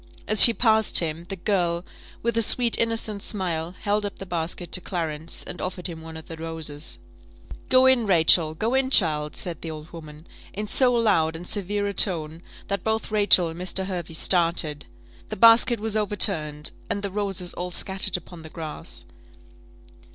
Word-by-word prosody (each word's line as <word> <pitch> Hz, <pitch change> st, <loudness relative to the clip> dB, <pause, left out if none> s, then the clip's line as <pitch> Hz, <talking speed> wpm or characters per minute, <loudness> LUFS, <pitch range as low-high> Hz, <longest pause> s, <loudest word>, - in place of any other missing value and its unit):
As 215 Hz, -, +3 dB
she 235 Hz, -, +12 dB
passed 220 Hz, -2 st, +3 dB
him, 165 Hz, 0 st, 0 dB
the 195 Hz, -, -4 dB
girl, 175 Hz, -2 st, -1 dB, 0.4 s
with 235 Hz, 0 st, -1 dB
a 230 Hz, -, +2 dB
sweet 235 Hz, +1 st, +3 dB
innocent 225 Hz, -3 st, 0 dB
smile, 175 Hz, -5 st, -3 dB
held 205 Hz, +1 st, -1 dB
up 205 Hz, -, -5 dB
the 195 Hz, -, -8 dB
basket 175 Hz, 0 st, -4 dB
to 185 Hz, -, 0 dB
Clarence, 160 Hz, -3 st, -4 dB
and 180 Hz, -, -7 dB
offered 180 Hz, -1 st, -6 dB
him 165 Hz, -3 st, -5 dB
one 160 Hz, 0 st, -10 dB
of 160 Hz, -, -11 dB
the 165 Hz, -, -9 dB
roses. 160 Hz, -2 st, -4 dB, 0.7 s
"Go 255 Hz, 0 st, +5 dB
in, 255 Hz, -4 st, +3 dB
Rachel! 160 Hz, -3 st, +4 dB
go 225 Hz, +8 st, -2 dB
in, 265 Hz, 0 st, +1 dB
child," 150 Hz, -, +3 dB
said 170 Hz, -4 st, -6 dB
the 165 Hz, -, -6 dB
old 155 Hz, +1 st, -10 dB
woman, 155 Hz, -1 st, -12 dB, 0.3 s
in 210 Hz, +2 st, -5 dB
so 250 Hz, +4 st, +3 dB
loud 200 Hz, -10 st, +1 dB
and 175 Hz, +2 st, -8 dB
severe 205 Hz, 0 st, -2 dB
a 200 Hz, -, -3 dB
tone, 165 Hz, -5 st, -2 dB, 0.3 s
that 200 Hz, -2 st, -3 dB
both 220 Hz, 0 st, -2 dB
Rachel 205 Hz, -5 st, +4 dB
and 165 Hz, +1 st, -9 dB
Mr. 185 Hz, +1 st, -2 dB
Hervey 175 Hz, -4 st, -6 dB
started; 165 Hz, -, 0 dB, 0.4 s
the -, -, -5 dB
basket 230 Hz, +2 st, +5 dB
was 220 Hz, 0 st, -3 dB
overturned, 170 Hz, -8 st, 0 dB, 0.2 s
and 200 Hz, -, -3 dB
the 200 Hz, -, -3 dB
roses 195 Hz, -3 st, -2 dB
all 180 Hz, +1 st, -5 dB
scattered 190 Hz, +1 st, 0 dB
upon 175 Hz, -1 st, -13 dB
the 160 Hz, -, -11 dB
grass. 155 Hz, -, -7 dB
180 Hz, 180 wpm, -23 LUFS, 160-210 Hz, 0.7 s, she